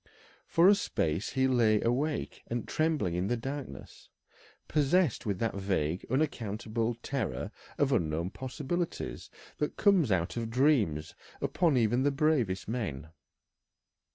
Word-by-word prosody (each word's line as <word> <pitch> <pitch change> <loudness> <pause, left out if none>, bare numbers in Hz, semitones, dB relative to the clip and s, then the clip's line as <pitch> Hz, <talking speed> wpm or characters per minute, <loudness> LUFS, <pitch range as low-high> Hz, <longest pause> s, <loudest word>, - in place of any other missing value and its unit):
For 170 +2 +5
a 200 - +8
space 85 - -1
he 130 0 +3
lay 115 -4 +3
awake 135 +7 -1
and 120 -1 -3
trembling 155 - 0
in 90 +2 -1
the 120 - 0
darkness, 135 +3 -7 0.6
possessed 150 - +2
with 100 -3 0
that 115 +3 -1
vague, 95 -4 -1
unaccountable 115 -4 -1
terror 135 -7 -3 0.3
of - - +2
unknown 80 +3 0
possibilities 145 +7 -4 0.3
that 150 - -2
comes 190 - +4
out 90 +3 0
of 115 -1 -2
dreams 115 - +2 0.3
upon 165 -7 +2
even 120 +2 +2
the 145 - +3
bravest 135 - +1
men. 100 - -3
120 Hz, 125 wpm, -30 LUFS, 100-145 Hz, 0.6 s, a